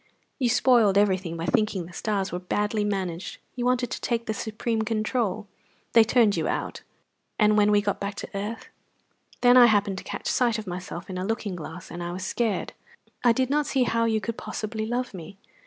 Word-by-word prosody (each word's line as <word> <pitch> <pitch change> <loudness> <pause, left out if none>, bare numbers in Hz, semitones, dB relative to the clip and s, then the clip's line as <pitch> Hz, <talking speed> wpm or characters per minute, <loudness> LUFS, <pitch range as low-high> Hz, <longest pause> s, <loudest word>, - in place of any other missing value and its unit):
"You 250 -3 +2
spoiled 230 -5 +4
everything 190 -4 +1
by 165 - -3
thinking 210 -4 +1
the 175 - -13
stars 200 -1 -2
were 180 - -3
badly 210 +3 -1
managed. 190 -4 -3 0.2
You 245 -1 -3
wanted 250 -1 +1
to - - -4
take 235 -1 -1
the 220 - -1
supreme 220 +1 -2
control. 215 -1 -1 0.5
They 230 - +8
turned 220 -2 +3
you - - -1
out." - - -3 0.6
"And 210 -1 +4
when 210 0 +4
we 205 0 +3
got 205 -1 -1
back 200 0 -4
to - - -7
earth?" 210 +3 -5 0.7
"Then 245 0 +7
I 245 -1 +9
happened 200 -3 +2
to - - -10
catch - - -6
sight 240 -3 +2
of 220 - -6
myself 180 0 -6
in 185 -1 -5
a - - -2
looking 215 -2 -2
glass, 170 +2 -8
and 170 +1 -6
I 175 0 -4
was 185 +1 -5
scared. 225 0 -1 0.5
I 240 - +6
did 260 +3 0
not 295 0 +1
see 265 -2 +2
how 230 -1 +1
you 220 -1 +1
could 230 +1 -4
possibly 220 0 -4
love 245 +1 -2
me. 190 +2 -9
210 Hz, 205 wpm, -26 LUFS, 190-235 Hz, 0.7 s, I